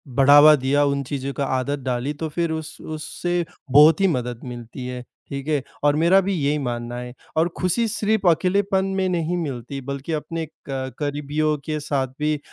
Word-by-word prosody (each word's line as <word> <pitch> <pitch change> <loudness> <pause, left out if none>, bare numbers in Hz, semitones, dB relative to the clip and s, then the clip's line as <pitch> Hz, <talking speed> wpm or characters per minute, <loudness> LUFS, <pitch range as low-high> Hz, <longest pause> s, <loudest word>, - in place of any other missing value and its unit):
बढ़ावा 145 +2 +8
दिया 140 +1 +2
उन 140 0 0
चीज़ों 140 0 -4
का 140 - 0
आदत 135 +2 -1
डाली, 125 +3 -1
तो 160 +2 -4
फिर 170 +2 -1
उस 160 -1 -5
उससे 175 +3 -3 0.3
बहुत 150 +6 +7
ही 195 - +5
मदद 125 -7 -2
मिलती 120 0 -8
है, 125 0 -5 0.3
ठीक 140 0 -5
है, 150 -3 +1 0.2
और 145 0 +4
मेरा 170 +5 +5
भी 195 +1 -1
यही 150 -3 +1
मानना 120 -3 -4
है। 125 0 -7 0.2
और 165 - +4
खुशी 225 +6 +1
सिर्फ़ 215 -2 0
अकेलेपन 190 +3 +1
में 190 -1 +1
नहीं 175 0 -1
मिलती, 135 -3 -4
बल्कि 140 +4 -5
अपने 165 +2 -3 0.2
क 130 -1 -3
करीबियों 150 +1 -1
के 155 -1 -2
साथ 140 -2 -1
भी 150 +1 +1
अ - - -7
145 Hz, 185 wpm, -23 LUFS, 135-165 Hz, 0.3 s, बढ़ावा